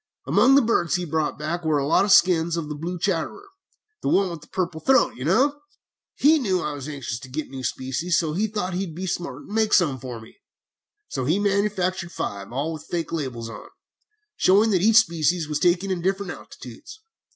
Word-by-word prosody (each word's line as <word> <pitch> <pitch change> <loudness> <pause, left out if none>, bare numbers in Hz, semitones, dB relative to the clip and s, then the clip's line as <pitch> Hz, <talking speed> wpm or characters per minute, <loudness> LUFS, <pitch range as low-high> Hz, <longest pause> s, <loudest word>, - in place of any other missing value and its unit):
Among 270 +2 +5
the 280 - +6
birds 195 -7 +1
he 180 0 -2
brought 155 -1 -1
back 165 +4 -3
were 155 -2 +2
a 140 - 0
lot 165 +6 +3
of 205 - 0
skins 170 -2 +4
of 155 -3 -4
the - - -3
blue 170 +4 -4
chatterer 190 - -2 0.5
the - - -1
one 190 -2 +2
with 165 -3 -7
the - - -16
purple 175 -3 -3
throat, 265 0 +3
you 125 - -7
know. 270 - +2 0.5
He 310 +2 +4
knew 190 -8 0
I 150 -3 -3
was 145 0 -7
anxious 135 -5 -5
to 130 - -11
get 150 +3 -5
new 135 -1 -7
species, 135 +8 -1
so 160 -3 0
he 205 +6 0
thought 205 -4 -3
he 190 +2 -2
would 160 - -10
be 185 +2 -4
smart 170 -7 -4
and - - -10
make 220 -1 +1
some 150 -8 +3
for 125 -2 -7
me. 110 - -15 0.7
So 130 -3 -3
he 160 +8 +2
manufactured 195 -3 0
five, 100 0 -5
all 145 +6 -2
with 155 - -9
faked 170 -2 -3
labels 130 -7 -4
on, 115 - -10 0.7
showing 210 +4 +4
that 185 -3 +2
each 220 +3 +5
species 170 -4 +2
was 150 -1 -2
taken 180 +3 +2
at 180 -2 -2
different 195 +1 -1
altitudes. 435 - -11
170 Hz, 215 wpm, -24 LUFS, 150-195 Hz, 0.7 s, the